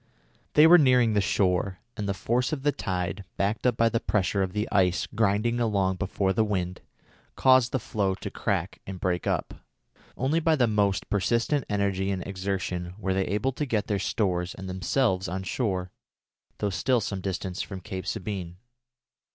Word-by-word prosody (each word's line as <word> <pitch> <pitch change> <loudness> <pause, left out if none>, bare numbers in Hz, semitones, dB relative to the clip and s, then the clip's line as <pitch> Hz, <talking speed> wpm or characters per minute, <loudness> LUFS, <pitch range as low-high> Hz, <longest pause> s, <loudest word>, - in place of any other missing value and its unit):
They 150 - +7
were 175 +2 +9
nearing 125 -5 +4
the 105 - +3
shore, 95 -1 +1 0.2
and 105 -1 -3
the 100 - 0
force 120 - 0
of 145 -4 -3
the 145 - +3
tide, 95 -3 -3
backed 105 +5 0
up 120 -2 +1
by 115 - +4
the 115 0 +1
pressure 100 -1 0
of 95 -1 -1
the 105 +3 -2
ice 90 -4 +2
grinding 110 +2 +1
along 100 -5 +1
before 95 +1 0
the 110 - +2
wind, 90 -4 -2 0.5
caused 130 -2 +5
the - - +1
floe 100 -5 -1
to - - -7
crack - - -2
and 95 -1 -6
break 90 -1 -1
up. - - -1 0.6
Only 140 +6 +1
by 160 -1 +3
the 130 -5 +3
most 105 -3 +1
persistent 115 +8 +1
energy 100 -2 0
and 95 -2 -2
exertion 95 -2 -3
were 95 -3 -1
they 95 0 +1
able 105 +8 0
to 140 - -4
get 110 -4 0
their 100 -2 -1
stores 90 -3 -1
and 95 - -8
themselves 95 +2 0
on 95 +3 -3
shore, 95 -3 -2 0.7
though 105 -1 -1
still 120 +8 +2
some 100 -3 -4
distance 95 0 -3
from 95 -2 -6
Cape 95 -1 -6
Sabine. 90 -3 -4
100 Hz, 180 wpm, -27 LUFS, 95-115 Hz, 0.7 s, were